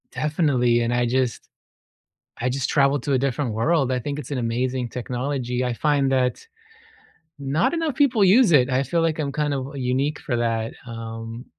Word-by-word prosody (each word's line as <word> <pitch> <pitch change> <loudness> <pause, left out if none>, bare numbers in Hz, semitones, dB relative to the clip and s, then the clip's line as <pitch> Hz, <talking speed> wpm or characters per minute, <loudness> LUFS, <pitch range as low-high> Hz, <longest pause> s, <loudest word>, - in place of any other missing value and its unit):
Definitely, 140 -6 +1
and 120 +1 0
I 120 0 +2
just 125 0 -1 0.9
I 125 - +1
just 135 +1 -2
traveled 140 -2 +2
to 140 - 0
a - - +4
different 135 -2 -1
world. 135 +4 +1
I 130 - 0
think 140 +4 -4
it's 150 - -8
an 140 - -1
amazing 125 +1 -1
technology. 125 0 -3
I 125 -1 -1
find 140 +1 +1
that 130 -1 +1 1.0
not 140 - 0
enough 325 -4 -1
people 255 -8 +3
use 200 +2 +5
it. 135 -4 +5
I 130 +1 +1
feel 165 +6 0
like 165 -1 0
I'm 145 -2 -1
kind 150 0 -1
of, 135 -1 -3
uh, - - -10
unique 135 +3 -1
for 130 - -3
that. 115 -1 -1
Um, 115 0 -7
130 Hz, 185 wpm, -23 LUFS, 120-145 Hz, 1.0 s, use